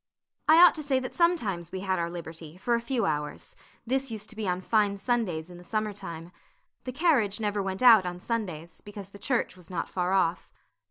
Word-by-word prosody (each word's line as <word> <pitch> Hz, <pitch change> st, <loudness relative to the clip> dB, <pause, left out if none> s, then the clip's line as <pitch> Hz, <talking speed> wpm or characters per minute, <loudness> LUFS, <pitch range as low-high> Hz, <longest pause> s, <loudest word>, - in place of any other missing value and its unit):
I 315 Hz, -, +9 dB
ought 355 Hz, +1 st, +9 dB
to 310 Hz, -, -5 dB
say 275 Hz, -3 st, +1 dB
that 255 Hz, -1 st, -6 dB
sometimes 220 Hz, -, +1 dB
we 190 Hz, -, -5 dB
had 190 Hz, -2 st, 0 dB
our 170 Hz, 0 st, -1 dB
liberty 165 Hz, -1 st, -9 dB
for 235 Hz, +6 st, -1 dB
a 235 Hz, -, +2 dB
few 235 Hz, 0 st, -1 dB
hours; 150 Hz, -1 st, -3 dB, 0.3 s
this 265 Hz, +2 st, 0 dB
used 215 Hz, -2 st, -6 dB
to -, -, -11 dB
be 215 Hz, -2 st, -3 dB
on 180 Hz, 0 st, 0 dB
fine 205 Hz, +1 st, +1 dB
Sundays 195 Hz, -8 st, -1 dB
in 175 Hz, -, -11 dB
the -, -, -13 dB
summer 215 Hz, +2 st, -2 dB
time. 170 Hz, -4 st, -8 dB, 0.5 s
The 255 Hz, -, -3 dB
carriage 255 Hz, -, +2 dB
never 205 Hz, -1 st, -1 dB
went 190 Hz, +4 st, -3 dB
out 225 Hz, -6 st, +8 dB
on 175 Hz, 0 st, -5 dB
Sundays, 180 Hz, -7 st, -4 dB
because 205 Hz, -2 st, -9 dB
the 200 Hz, -, -13 dB
church 240 Hz, -3 st, 0 dB
was 180 Hz, -3 st, -14 dB
not 175 Hz, -3 st, -3 dB
far 180 Hz, 0 st, -1 dB
off. 175 Hz, -3 st, +1 dB
200 Hz, 215 wpm, -28 LUFS, 175-235 Hz, 0.5 s, I